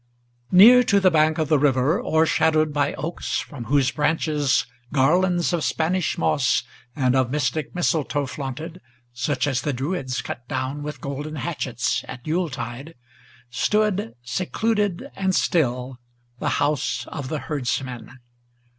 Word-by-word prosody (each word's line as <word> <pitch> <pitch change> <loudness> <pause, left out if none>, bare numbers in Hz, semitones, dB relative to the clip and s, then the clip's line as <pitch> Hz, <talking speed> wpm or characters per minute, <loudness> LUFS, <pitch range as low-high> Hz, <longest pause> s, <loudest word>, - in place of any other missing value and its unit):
NEAR 230 +7 +9
to 200 - +4
the 190 -2 +4
bank 155 -1 +3
of 155 -2 0
the 155 -1 +3
river, 135 +3 +2
o'ershadowed 155 -1 +2
by 145 -1 0
oaks, 160 +6 -3
from 130 -6 -7
whose 135 -1 +2
branches 150 -2 +1 0.3
Garlands 175 +6 +2
of 170 -3 0
Spanish 175 +2 0
moss 125 -3 +2 0.3
and 130 -3 +2
of 130 -2 +2
mystic 150 +3 -2
mistletoe 155 -5 0
flaunted, 150 +6 -6 0.3
Such 130 +1 -1
as 135 -4 0
the 145 +1 -2
Druids 135 -1 -3
cut 120 - -7
down 135 +4 -3
with 150 +1 -6
golden 145 +2 -5
hatchets 130 -5 -2
at 125 - -9
Yule 170 +2 0
tide, 130 +4 -7 0.6
Stood, 205 - 0
secluded 205 - -1
and 190 -1 0
still, 125 -5 0 0.4
the 150 - -1
house 145 0 0
of 145 -4 -5
the 155 - -2
herdsman. 130 -3 -4
150 Hz, 135 wpm, -23 LUFS, 130-165 Hz, 0.6 s, NEAR